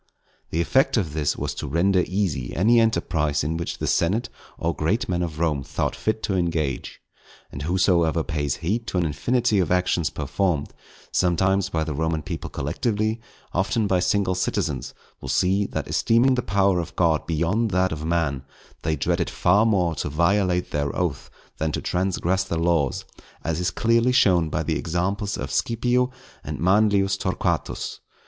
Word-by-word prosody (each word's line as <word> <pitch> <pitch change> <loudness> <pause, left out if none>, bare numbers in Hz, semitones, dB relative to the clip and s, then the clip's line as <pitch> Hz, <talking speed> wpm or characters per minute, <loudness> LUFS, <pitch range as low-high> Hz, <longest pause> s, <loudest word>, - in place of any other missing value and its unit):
The 85 - 0
effect 135 +8 +2
of 85 -9 -1
this 75 -2 0
was - - -3
to - - -5
render 90 +3 +2
easy 90 -10 -2
any 115 +6 +4
enterprise 80 -10 +1
in 80 +3 -1
which 85 +1 -4
the - - -3
senate 105 +8 +1 0.3
or 85 +1 -1
great 105 +11 0
men 90 -1 -1
of 80 -3 -3
Rome 80 -4 0
thought - - -2
fit 110 0 -2
to 95 - 0
engage. 80 -6 -2 0.5
And 70 - -7
whosoever 85 -1 +2
pays 75 -5 -2
heed 115 +6 -1
to - - -2
an 90 - +2
infinity 115 - +1
of 90 -4 0
actions 90 -4 +1
performed, 90 -8 -1 0.4
sometimes 95 +2 +2
by 80 -1 -1
the 80 -1 -3
Roman 80 +1 -1
people - - -5
collectively, 110 - -1 0.3
often 100 +4 +1
by 95 -2 +2
single 95 +1 +1
citizens, 90 - -2 0.3
will 65 - -7
see, 95 +9 +2
that - - -4
esteeming 120 +4 +3
the 125 - +1
power 100 -3 +2
of 85 - -5
God 80 -3 +1
beyond 85 +8 +1
that 95 -1 +1
of 80 0 -4
man, 80 -5 0 0.4
they 80 0 0
dreaded 70 - 0
far 100 +5 +3
more 90 -6 +2
to - - -2
violate 90 +3 +1
their 70 -1 -1
oath 80 -7 -2 0.3
than 80 0 0
to - - -1
transgress 95 0 0
the 85 -3 -3
laws; 80 -5 +1 0.4
as 80 0 -1
is 90 -1 +1
clearly 115 +7 +2
shown 90 -9 +4
by - - -1
the - - -1
examples 95 +5 -2
of - - -5
Scipio 125 +2 +1 0.3
and - - -5
of - - -5
Manlius 100 0 +3
Torquatus. 95 -1 -2
90 Hz, 170 wpm, -24 LUFS, 80-100 Hz, 0.5 s, any